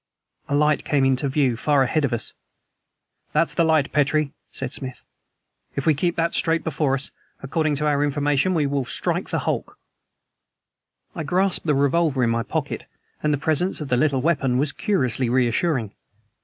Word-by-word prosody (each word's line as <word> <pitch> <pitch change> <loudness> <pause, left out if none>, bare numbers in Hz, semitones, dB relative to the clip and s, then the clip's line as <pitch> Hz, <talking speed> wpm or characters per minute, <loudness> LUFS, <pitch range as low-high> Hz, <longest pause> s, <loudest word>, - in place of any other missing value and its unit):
A 140 - +1
light 150 +1 +2
came 140 -3 +2
into 135 +1 +1
view 135 -3 +1
far 140 +3 +2
ahead 150 +5 0
of 135 - -2
us. 120 -1 -2 1.0
"That's - - +2
the 170 - +2
light, 160 -3 +2
Petrie," 150 0 +1 0.2
said 135 0 -2
Smith. 130 -2 -3 0.7
"If 140 - -3
we 160 - +5
keep 170 +4 -1
that 165 0 0
straight 165 0 +1
before 145 -3 0
us, 135 +1 -3 0.3
according 155 +2 0
to 150 +2 -1
our 145 -1 +2
information 145 +4 +1
we 150 -3 +2
shall 140 -1 -1
strike - - -2
the - - -1
hulk." - - -2 1.4
I - - -5
grasped 180 +4 0
the 150 - +3
revolver 140 -1 +2
in 115 - +2
my 115 0 0
pocket, - - -3 0.4
and 150 - +1
the 145 - +1
presence 160 +5 0
of 150 -3 -5
the 125 - +3
little 135 -1 +1
weapon 140 -6 +1
was 145 +2 +1
curiously 130 - 0
reassuring. 125 - +1
145 Hz, 175 wpm, -23 LUFS, 135-155 Hz, 1.4 s, we